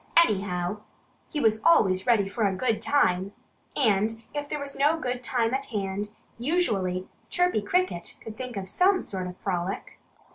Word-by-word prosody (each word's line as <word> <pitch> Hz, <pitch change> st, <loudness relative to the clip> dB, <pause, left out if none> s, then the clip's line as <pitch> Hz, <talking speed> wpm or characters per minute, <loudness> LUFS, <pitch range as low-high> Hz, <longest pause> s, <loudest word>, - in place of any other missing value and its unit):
Anyhow, 195 Hz, -, +2 dB, 0.5 s
he 305 Hz, -, -2 dB
was 220 Hz, -3 st, +2 dB
always 190 Hz, -, +4 dB
ready 220 Hz, -5 st, +4 dB
for 210 Hz, +3 st, -2 dB
a 190 Hz, -, -1 dB
good 220 Hz, +1 st, 0 dB
time. 195 Hz, -9 st, +2 dB, 0.4 s
And 225 Hz, -2 st, +2 dB
if 290 Hz, -1 st, -4 dB
there -, -, -2 dB
was 285 Hz, -1 st, -5 dB
no 300 Hz, +4 st, +3 dB
good 250 Hz, -3 st, -2 dB
time 240 Hz, -1 st, 0 dB
at 270 Hz, +1 st, -1 dB
hand, 205 Hz, -2 st, -3 dB, 0.3 s
usually 205 Hz, -, 0 dB, 0.2 s
Chirpy 355 Hz, -10 st, +2 dB
Cricket 355 Hz, -, -1 dB
could 220 Hz, -, -9 dB
think 250 Hz, -1 st, -6 dB
of 190 Hz, -1 st, -4 dB
some 370 Hz, -, +3 dB
sort 185 Hz, -2 st, -4 dB
of 180 Hz, 0 st, -8 dB
frolic. 185 Hz, -1 st, -3 dB
220 Hz, 160 wpm, -27 LUFS, 190-280 Hz, 0.5 s, always